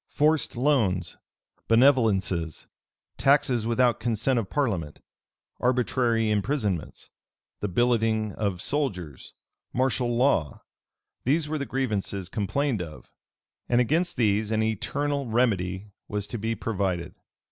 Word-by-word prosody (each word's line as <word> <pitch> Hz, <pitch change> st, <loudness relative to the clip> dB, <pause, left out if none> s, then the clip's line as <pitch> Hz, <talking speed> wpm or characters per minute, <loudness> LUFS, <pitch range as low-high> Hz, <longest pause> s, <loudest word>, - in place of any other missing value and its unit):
Forced 150 Hz, -2 st, +1 dB
loans, 110 Hz, -, +1 dB, 0.5 s
benevolences, 105 Hz, -, +2 dB, 0.5 s
taxes 130 Hz, -5 st, +3 dB
without 120 Hz, 0 st, +2 dB
consent 120 Hz, +2 st, +1 dB
of 100 Hz, -5 st, -4 dB
parliament, 95 Hz, -, -1 dB, 0.6 s
arbitrary 120 Hz, -2 st, +1 dB
imprisonments, 105 Hz, -, -2 dB, 0.5 s
the 105 Hz, -, -2 dB
billeting 110 Hz, 0 st, +1 dB
of 100 Hz, -4 st, -2 dB
soldiers, 95 Hz, -, -3 dB, 0.4 s
martial 125 Hz, -2 st, +1 dB
law; 120 Hz, -, +1 dB, 0.6 s
these 150 Hz, +4 st, +1 dB
were 155 Hz, 0 st, -2 dB
the 140 Hz, -, -3 dB
grievances 105 Hz, -7 st, -2 dB
complained 115 Hz, +3 st, -1 dB
of, 80 Hz, -3 st, -9 dB, 0.6 s
and 120 Hz, -, +3 dB
against 165 Hz, +9 st, +1 dB
these 105 Hz, -2 st, +2 dB
an 110 Hz, 0 st, +1 dB
eternal 140 Hz, +6 st, -1 dB
remedy 105 Hz, -4 st, 0 dB, 0.2 s
was 105 Hz, -1 st, -3 dB
to 115 Hz, +3 st, -6 dB
be 115 Hz, +2 st, -1 dB
provided. 95 Hz, -7 st, -2 dB
115 Hz, 110 wpm, -26 LUFS, 100-130 Hz, 0.6 s, taxes